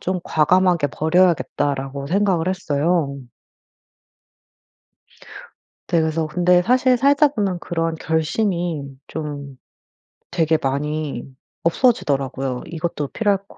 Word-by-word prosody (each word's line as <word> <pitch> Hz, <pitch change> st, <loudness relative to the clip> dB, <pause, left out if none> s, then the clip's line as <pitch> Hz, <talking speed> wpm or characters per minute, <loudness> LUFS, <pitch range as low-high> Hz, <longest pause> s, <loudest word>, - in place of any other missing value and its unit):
좀 185 Hz, 0 st, -2 dB
과감하게 175 Hz, 0 st, +2 dB
버려야겠다.'라고 145 Hz, -4 st, 0 dB
생각을 185 Hz, -1 st, +1 dB
했어요. 160 Hz, -4 st, 0 dB, 2.7 s
네. 170 Hz, -, +3 dB
그래서 160 Hz, 0 st, 0 dB
근데 180 Hz, +2 st, +3 dB
사실 250 Hz, +3 st, +3 dB
살다 285 Hz, +3 st, +4 dB
보면 200 Hz, -9 st, -2 dB
그런 165 Hz, -1 st, -2 dB
결심이 165 Hz, 0 st, -1 dB, 0.2 s
좀 145 Hz, -3 st, -6 dB, 0.8 s
되게 160 Hz, -1 st, +2 dB
많이 150 Hz, +2 st, -2 dB, 0.4 s
없어지더라고요. 135 Hz, -, +1 dB
이것도 160 Hz, -3 st, -4 dB
필요할 205 Hz, -3 st, +1 dB
것 -, -, -17 dB
165 Hz, 240 characters per minute, -21 LUFS, 145-185 Hz, 2.7 s, 살다